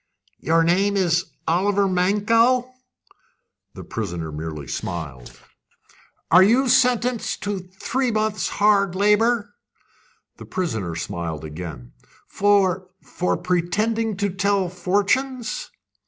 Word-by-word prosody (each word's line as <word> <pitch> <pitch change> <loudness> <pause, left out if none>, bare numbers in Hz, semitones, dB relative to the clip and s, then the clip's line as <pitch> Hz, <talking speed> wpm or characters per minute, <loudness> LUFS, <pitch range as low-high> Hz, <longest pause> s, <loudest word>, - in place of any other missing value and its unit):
"Your 165 +1 +2
name 195 +4 +2
is 180 -1 +2 0.2
Oliver 195 +4 +2
Mankell?" 225 +7 +2 1.0
The - - -8
prisoner 85 -7 -5
merely 75 -1 -6
smiled. 70 -5 -6 0.9
"You 205 +9 +6
are - - -2
sentenced 245 -1 +1
to 205 -1 -2 0.2
three 260 +1 0
months' 215 -1 -1
hard 200 -3 +2
labour?" 210 +3 +2 0.8
The - - -10
prisoner 110 - -3
smiled 80 -2 -5
again. 75 -6 -8 0.4
"For 195 -2 +2 0.2
for 180 - -2
pretending 200 +5 -1
to 200 -1 -1
tell 195 0 0
fortunes?" 205 +7 -1
195 Hz, 100 wpm, -22 LUFS, 165-215 Hz, 1.0 s, You